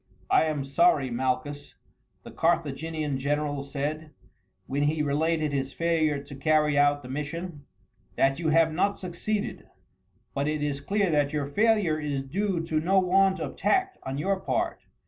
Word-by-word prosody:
"I - - +5
am 150 -3 -1
sorry, 140 -2 +3
Malchus," 130 +4 -2 0.5
the - - -10
Carthaginian 155 -3 -1
general 145 0 -1
said, 150 +3 -4 0.6
when 140 +2 -2
he 150 +1 +1
related 155 +1 0
his 135 -1 -2
failure 160 -3 +1
to 140 - -10
carry 150 +1 +2
out 145 0 +3
the - - -9
mission, 150 +3 -5 0.5
"that 135 +2 +2
you 165 -2 0
have 160 0 +4
not 200 +5 +1
succeeded, 200 +4 -3 0.7
but 140 +1 -1
it 150 -1 -1
is 140 -1 -2
clear 200 +3 +1
that 145 -1 +1
your 150 -2 0
failure 200 -1 +2
is 145 -3 -2
due 185 +5 -1
to 160 -1 -1
no 190 +5 +3
want 190 +1 +3
of - - -4
tact 380 0 +1
on 135 +1 -4
your 190 +5 0
part. 335 - -2
155 Hz, 160 wpm, -27 LUFS, 140-170 Hz, 0.7 s, I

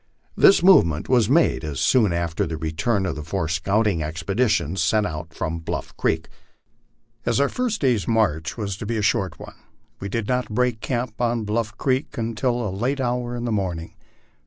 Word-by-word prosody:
This 195 - +6
movement 85 - +5
was 120 -4 +3
made 80 - +2
soon 110 - +3
after 85 -1 -1
the 80 -1 -4
return 80 +7 -1
of 85 - -2
the 75 - -5
four 85 +2 -2
scouting 95 +3 +1
expeditions 85 - 0
sent 110 -1 +2
out 80 -2 -5
from 80 +1 -3
Bluff 80 - -5
creek. - - -1 1.0
As - - +1
our 140 - +4
first 245 -4 -2
day's 125 -7 +1
march 80 -10 0
was 100 -2 -3
to 105 - -6
be 115 0 -1
a 105 - -1
short 95 -8 0
one, - - -10 0.5
we 100 - -5
did 110 +1 -2
not 125 0 0
break 120 0 0
camp 120 -2 -3
on 120 -1 0
Bluff 105 +1 -2
creek 130 0 -1
until 115 +1 -1
a 95 - -4
late 130 +7 -1
hour 120 -1 -1
in 120 0 -4
the 120 - -1
morning. 90 -5 -2
105 Hz, 180 wpm, -23 LUFS, 85-120 Hz, 1.0 s, This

